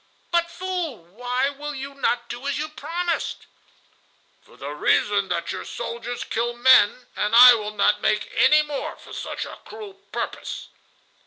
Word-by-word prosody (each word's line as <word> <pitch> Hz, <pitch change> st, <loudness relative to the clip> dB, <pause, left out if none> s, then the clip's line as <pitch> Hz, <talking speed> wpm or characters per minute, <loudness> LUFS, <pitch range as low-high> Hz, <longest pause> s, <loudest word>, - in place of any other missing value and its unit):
"But, 340 Hz, -1 st, +2 dB
fool, 355 Hz, -, -4 dB
why 245 Hz, +8 st, -1 dB
will 295 Hz, +1 st, -7 dB
you 275 Hz, +1 st, -6 dB
not 245 Hz, -3 st, -1 dB
do 245 Hz, +4 st, -6 dB
as 280 Hz, -, -1 dB
you 305 Hz, +1 st, -3 dB
promised?" 335 Hz, +2 st, -3 dB, 1.0 s
"For -, -, -21 dB
the 140 Hz, +1 st, -6 dB
reason 200 Hz, +6 st, +1 dB
that 170 Hz, -1 st, -2 dB
your -, -, -5 dB
soldiers 235 Hz, 0 st, -5 dB
kill 235 Hz, +1 st, -2 dB
men, 245 Hz, -1 st, +5 dB
and 210 Hz, +2 st, 0 dB
I 250 Hz, +1 st, +11 dB
will 210 Hz, -2 st, -3 dB
not 200 Hz, -, +2 dB
make -, -, 0 dB
any 305 Hz, -8 st, +5 dB
more 295 Hz, -2 st, -5 dB
for -, -, -14 dB
such -, -, -5 dB
a -, -, -10 dB
cruel 425 Hz, -2 st, -10 dB, 0.2 s
purpose." -, -, -5 dB
250 Hz, 160 wpm, -23 LUFS, 225-305 Hz, 1.0 s, I